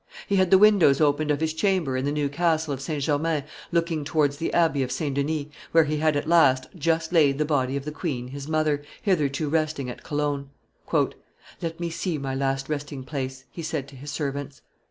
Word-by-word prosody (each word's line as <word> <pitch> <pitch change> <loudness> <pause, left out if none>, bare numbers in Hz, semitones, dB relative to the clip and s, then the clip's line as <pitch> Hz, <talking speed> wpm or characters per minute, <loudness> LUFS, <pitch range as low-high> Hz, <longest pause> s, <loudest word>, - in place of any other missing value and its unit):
He 200 - +1
had 185 -1 +3
the 190 - +7
windows 195 -9 +6
opened 150 0 +2
of 145 0 +1
his 160 -1 0
chamber 165 -5 +1
in 130 +1 -1
the 145 - 0
new 145 -1 0
castle 160 0 0
of 135 - -5
St. 145 0 -3
Germain 150 0 0 0.3
looking 165 -2 0
towards 145 -1 +1
the 165 - -2
Abbey 165 -5 +2
of 130 -1 -2
St. 140 +2 -2
Denis, 145 +2 -1 0.3
where 165 0 +7
he 155 0 -1
had, 155 0 +2
at 145 +1 -1
last, 130 -6 +5
just 165 0 0
laid 145 -5 +4
the 150 - +1
body 140 -3 0
of 140 - -6
the 150 - -3
queen 135 -6 -4
his 140 +1 -7
mother, 155 -2 +1 0.2
hitherto 155 - +1
resting 155 -4 -1
at - - -10
Cologne. 145 -2 -2 1.1
"Let 165 0 -4
me 170 -1 -2
see 170 0 -2
my 135 -2 -3
last 135 0 -1
resting 145 -2 -4
place," 130 -1 -5
he 170 - -7
said 155 -4 -3
to 140 - -14
his 140 +3 -9
servants. 140 -2 -4
150 Hz, 210 wpm, -25 LUFS, 140-160 Hz, 1.1 s, the